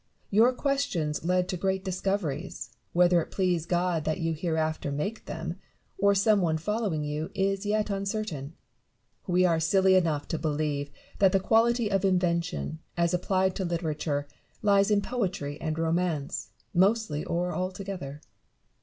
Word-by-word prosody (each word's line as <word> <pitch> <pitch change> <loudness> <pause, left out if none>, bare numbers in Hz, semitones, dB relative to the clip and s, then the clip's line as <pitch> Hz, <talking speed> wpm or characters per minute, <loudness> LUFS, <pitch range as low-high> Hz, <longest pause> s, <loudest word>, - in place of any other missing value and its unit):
Your 225 +5 +6
questions 250 - -1
lead 180 +1 +2
to 185 - -2
great 190 +2 -1
discoveries; 185 -4 -2 0.2
whether 175 0 +4
it - - -7
please 180 -4 0
God 175 -2 +1
that 155 +3 -1
you 165 -1 0
hereafter 160 -2 -1
make 200 +11 -3
them, 165 +2 -5 0.4
or 200 +1 +4
some 205 +1 +4
one 160 -3 +1
following 195 -2 -1
you, 150 +2 -3
is 195 +1 0
yet 210 0 +1
uncertain. 195 -7 -3 0.7
We 180 0 +3
are 165 -2 +3
silly 190 +4 +4
enough 165 -6 +2
to 165 - -1
believe 150 -2 -1 0.3
that 195 -2 +5
the 195 - +4
quality 225 +2 +3
of 195 0 +1
invention, 170 -3 0 0.2
as 170 0 +2
applied 185 +1 +1
to 190 - -1
literature, 155 -4 -2 0.4
lies 200 -1 +4
in 205 -1 +3
poetry 185 - -3
and 155 -1 -2
romance, 165 -3 -1 0.2
mostly 190 -4 +2
or 175 +1 -1
altogether. 185 -6 -4
180 Hz, 145 wpm, -28 LUFS, 160-195 Hz, 0.7 s, Your